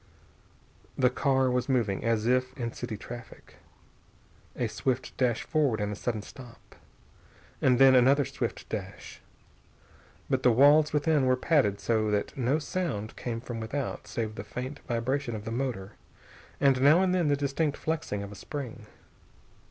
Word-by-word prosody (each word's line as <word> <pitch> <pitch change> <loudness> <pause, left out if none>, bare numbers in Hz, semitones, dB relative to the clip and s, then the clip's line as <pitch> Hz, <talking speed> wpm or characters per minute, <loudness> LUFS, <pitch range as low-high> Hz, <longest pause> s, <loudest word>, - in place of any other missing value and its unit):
The 130 -2 +3
car 130 -1 +2
was 125 +2 -1
moving 115 -7 0
as 115 -1 +1
if 130 +1 +1
in 120 -2 -3
city 115 -3 -5
traffic, 120 +3 -11 1.0
a 125 - -1
swift 120 +4 -2
dash 120 -3 0
forward 145 -8 +1
and 105 0 -1
a - - -4
sudden 110 0 -3
stop, 120 -1 -14 0.9
and 125 -1 +4
then 135 0 +7
another 135 +3 +5
swift - - -4
dash. - - -7 1.1
But 130 -2 0
the 125 - +5
walls 145 +5 +5
within 150 -2 +2
were 130 - +4
padded 130 -8 +2
so 110 -2 +1
that 105 -1 -1
no 130 +2 +1
sound 150 - -3
came 115 -2 -4
from 120 -2 -6
without 130 +5 -4
save 110 -2 -3
the 100 - -7
faint 130 +6 -6
vibration 120 +1 -1
of 105 0 -7
the 115 - -4
motor 115 -6 -3 0.7
and 135 -2 +3
now 155 +7 +6
and 185 -1 +2
then 175 -4 +2
the 145 - +3
distinct 140 +1 -1
flexing 155 -11 -3
of 100 - -8
a - - -9
spring. 120 -2 -7
125 Hz, 160 wpm, -28 LUFS, 115-140 Hz, 1.1 s, then